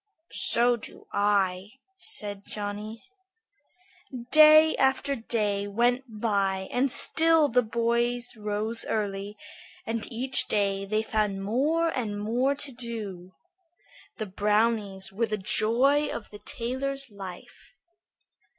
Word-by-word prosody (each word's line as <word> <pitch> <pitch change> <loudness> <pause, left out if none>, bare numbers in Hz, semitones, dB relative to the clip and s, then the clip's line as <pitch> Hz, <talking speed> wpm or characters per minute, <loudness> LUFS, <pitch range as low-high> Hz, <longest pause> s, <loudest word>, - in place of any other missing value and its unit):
"So 240 +1 +3
do - - -11
I," 200 -1 +1 0.3
said 205 - -2
Johnny. 210 +2 -6 1.3
Day 310 +1 +7
after 265 +1 +1
day 210 -4 -1
went 240 +5 +1
by 195 -4 0
and 260 +3 +1
still 320 +3 +4
the 250 +2 +3
boys 235 +2 0
rose 215 +1 -2
early, 205 -1 -3 0.5
and 225 +1 -3
each 255 +3 0
day 195 -1 0
they 215 +2 0
found 210 -3 -1
more 300 +11 +1
and 220 -8 -3
more 245 +6 0
to 280 0 -2
do. 210 -7 -6 0.8
The 215 - -3
brownies 205 -1 0
were 230 +3 0
the 215 -1 -2
joy 250 +9 +2
of 220 - -6
the 205 - -10
tailor's 265 +3 -3
life. 195 - -11
225 Hz, 115 wpm, -27 LUFS, 205-250 Hz, 1.3 s, Day